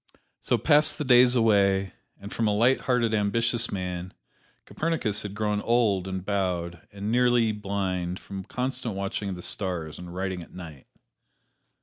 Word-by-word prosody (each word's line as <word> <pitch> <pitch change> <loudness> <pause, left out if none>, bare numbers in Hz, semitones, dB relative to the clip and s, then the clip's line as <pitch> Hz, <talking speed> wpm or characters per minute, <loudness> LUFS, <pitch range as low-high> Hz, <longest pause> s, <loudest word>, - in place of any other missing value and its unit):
So 120 - +1
passed 150 +6 +3
the 150 - -2
days 125 0 +6
away, 100 -4 +3 0.3
and 100 +1 -9
from 115 - 0
a 105 - +1
light 120 +5 +3
hearted, 120 -3 +1
ambitious 115 +3 +2
man, 90 -1 -5 0.5
Copernicus 145 -11 -1
had 100 -1 -7
grown 105 -1 -1
old 105 -6 +1
and 95 -1 -5
bowed, 90 -4 -2
and 100 +2 -4
nearly 120 -2 +3
blind 95 -4 -3
from 95 -1 -8
constant 125 -2 -3
watching 100 +1 -3
of 95 - -4
the 90 - -9
stars 90 -6 -3
and 90 -1 -9
writing 95 0 -3
at 85 - -13
night. 80 -7 -10
100 Hz, 155 wpm, -26 LUFS, 95-115 Hz, 0.5 s, days